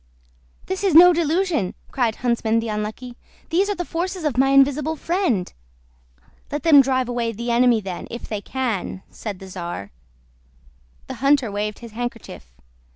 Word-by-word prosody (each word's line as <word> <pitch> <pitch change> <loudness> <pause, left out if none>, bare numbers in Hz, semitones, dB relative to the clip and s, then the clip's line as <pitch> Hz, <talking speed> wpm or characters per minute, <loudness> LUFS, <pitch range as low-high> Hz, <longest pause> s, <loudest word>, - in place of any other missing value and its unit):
"This 380 +1 -4
is 380 -6 +2
no 355 +2 +9
delusion!" 330 - 0 0.2
cried 235 -4 0
Huntsman 235 -2 0
the 225 0 -4
Unlucky. 215 +4 -5 0.3
"These 380 +5 +2
are 410 - 0
the 355 - -4
forces 360 +2 -3
of 295 -6 0
my 265 +1 +3
invisible 280 +3 +3
friend." 330 - -1 1.0
"Let 295 0 -3
them 305 -4 +8
drive 260 -1 0
away 240 -1 -1
the 235 +3 -3
enemy 235 -1 +4
then, 185 -3 -6
if 235 - -7
they 210 -2 -4
can," 220 -6 -3
said 210 -4 -6
the 190 - -11
czar. 175 - -6 1.1
The - - -6
hunter 275 -5 +3
waved 210 +1 -3
his 230 - -11
handkerchief. 230 - -7
245 Hz, 155 wpm, -22 LUFS, 215-305 Hz, 1.1 s, no